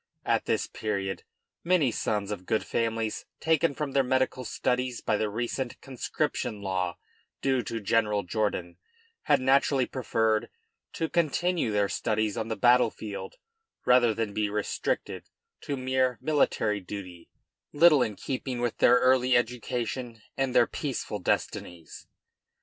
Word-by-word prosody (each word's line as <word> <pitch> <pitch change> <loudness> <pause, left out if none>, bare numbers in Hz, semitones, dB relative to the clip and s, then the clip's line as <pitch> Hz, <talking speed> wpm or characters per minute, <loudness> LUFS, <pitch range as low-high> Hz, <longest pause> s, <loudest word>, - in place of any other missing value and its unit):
At - - +1
this - - +1
period 100 -3 -3 0.4
many 170 -7 +3
sons 105 -2 -1
of 95 -3 -6
good 110 - 0
families 115 -1 -2
taken 160 -1 +2
from 150 -3 -3
their 135 - +3
medical 130 0 0
studies 125 0 -1
by 105 - 0
the 105 0 0
recent 120 +3 -3
conscription 130 -3 -3
law 90 -2 -1 0.5
due 130 -2 +2
to 115 +1 -4
General 105 -1 +1
Jourdan, 90 -2 -2 0.5
had - - +4
naturally 135 0 +3
preferred 110 -4 0 0.4
to 160 - -1
continue 170 -3 +1
their 105 -1 +2
studies 110 0 -1
on 110 -1 -3
the 115 - -2
battle 125 0 +5
field 105 - -7 0.5
rather 125 -2 +5
than 110 -1 -2
be 105 0 0
restricted 105 0 -3 0.3
to 140 - -4
mere 130 -1 +1
military 115 -8 +1
duty, 90 -3 -9 0.4
little 150 -2 +6
in 110 -4 0
keeping 130 0 -4
with 120 -2 -2
their 125 - +6
early 130 0 +4
education 120 -1 -3
and 135 -2 -1
their - - +6
peaceful 130 -7 -4
destinies. 85 -2 -3
120 Hz, 140 wpm, -28 LUFS, 105-130 Hz, 0.5 s, little